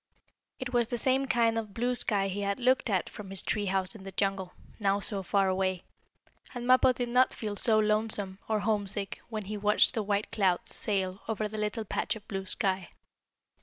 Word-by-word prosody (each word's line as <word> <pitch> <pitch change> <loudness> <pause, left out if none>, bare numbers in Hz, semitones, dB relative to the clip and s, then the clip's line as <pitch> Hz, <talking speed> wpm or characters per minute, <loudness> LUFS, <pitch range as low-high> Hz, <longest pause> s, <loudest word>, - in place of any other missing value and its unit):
It 255 -1 -6
was 240 -2 +2
the 240 - -3
same 265 +2 +2
kind 230 -2 +2
of 210 -3 -8
blue 245 +2 0
sky 205 -5 +1
he 195 +1 -4
had 200 +2 -2
looked 255 0 +2
at 190 -4 0
from 205 -2 -10
his 195 -1 -1
tree 205 -2 -1
house 190 -1 +2
in 215 -4 -12
the 195 - -8
jungle, 195 -1 -2 0.3
now 200 -1 +1
so 200 0 -3
far 195 +1 +1
away, 185 -1 -1 0.7
and 245 0 -5
Mappo 255 +1 +5
did 245 -1 -3
not 250 +2 +3
feel 210 -2 -4
so 220 +2 +4
lonesome, 215 -2 +2
or 215 -1 +1
homesick, 205 -1 -1
when 215 -2 -4
he 210 +2 -5
watched 210 +1 +4
the 225 - -1
white 205 0 -2
clouds 185 -4 +3
sail 190 -2 -1
over 215 -1 -2
the 215 +1 -6
little 210 +1 -2
patch - - -2
of 215 - -12
blue 195 -1 -5
sky. 190 -3 -2
210 Hz, 205 wpm, -29 LUFS, 195-225 Hz, 0.7 s, Mappo